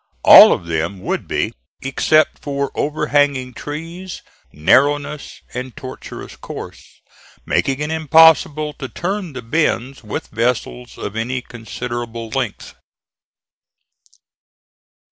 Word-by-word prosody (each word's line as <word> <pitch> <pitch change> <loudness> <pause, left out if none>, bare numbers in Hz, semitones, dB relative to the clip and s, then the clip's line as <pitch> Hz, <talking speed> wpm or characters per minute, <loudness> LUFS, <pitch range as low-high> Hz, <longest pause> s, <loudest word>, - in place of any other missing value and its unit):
All - - +10
of - - -1
them 85 +3 -3
would - - -3
be, - - -1 0.3
except 155 +3 +2
for 140 -1 -3
overhanging 145 -3 0
trees, 165 +8 -7 0.3
narrowness 145 - +1
and 125 0 -6
tortuous 130 - -9
course, - - -10 0.4
making 135 0 0
it 150 +1 -2
impossible 160 -1 +4
to 135 - -5
turn 185 -2 -4
the 125 -1 -7
bends 135 -1 -1
with 105 - -5
vessels 120 +1 -2
of 100 - -6
any 125 +3 -2
considerable 115 -1 -6
length. - - -4
135 Hz, 105 wpm, -19 LUFS, 120-150 Hz, 0.4 s, All